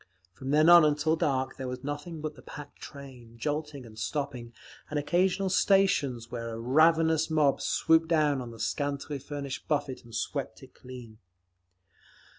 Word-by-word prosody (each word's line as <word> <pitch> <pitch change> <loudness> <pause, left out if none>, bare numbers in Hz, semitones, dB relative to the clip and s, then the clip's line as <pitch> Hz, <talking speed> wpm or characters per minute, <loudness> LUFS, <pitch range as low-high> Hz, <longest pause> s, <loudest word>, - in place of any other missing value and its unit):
From 130 +8 -8
then 155 +2 +4
on 175 -1 +9
until 150 +1 +2
dark 130 -4 -1
there 130 - -5
was 125 +1 -6
nothing 145 +3 -5
but 155 0 -4
the - - -15
packed 145 -1 -11
train, 125 -5 -11
jolting 150 +1 -4
and 110 -1 -12
stopping, 140 -5 -4 0.4
and 150 - -3
occasional 180 +6 +1
stations 150 - +2
where 115 -1 -4
a - - -7
ravenous 160 +5 +3
mob 150 -3 +2
swooped 160 0 +2
down 150 -5 +2
on 120 - -7
the 115 -1 -12
scantily 140 +4 -3
furnished 140 -1 -6
buffet 145 -4 -1
and 115 -1 -12
swept - - -4
it - - -15
clean…. 125 -4 -12
145 Hz, 160 wpm, -28 LUFS, 125-155 Hz, 0.4 s, on